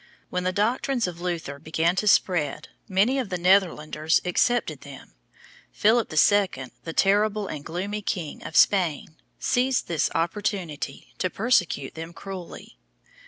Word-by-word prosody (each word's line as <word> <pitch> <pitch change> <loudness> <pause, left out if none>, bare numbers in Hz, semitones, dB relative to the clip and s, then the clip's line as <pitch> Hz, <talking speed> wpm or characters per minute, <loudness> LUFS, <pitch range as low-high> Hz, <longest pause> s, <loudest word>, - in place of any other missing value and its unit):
When 180 0 -2
the 185 - +2
doctrines 235 +5 0
of 175 -1 -6
Luther 165 -6 -4
began 160 +3 0
to 210 - 0
spread 155 -7 +2 0.2
many 210 +8 +2
of 245 -6 -3
the 180 - -2
Netherlanders 170 -4 +2
accepted 180 - +1
them. 140 - -12 0.6
Philip 225 +2 +2
II., 155 -5 +2
the 165 - -4
terrible 205 +2 +2
and 150 -6 -6
gloomy 200 +6 -4
king 175 -6 -4
of - - -8
Spain, 165 -5 +3 0.2
seized 255 +1 +1
this 160 -3 0
opportunity 170 -5 -3
to 185 - 0
persecute 180 - 0
them 165 +1 -8
cruelly. 180 - -9
180 Hz, 135 wpm, -25 LUFS, 160-205 Hz, 0.6 s, Spain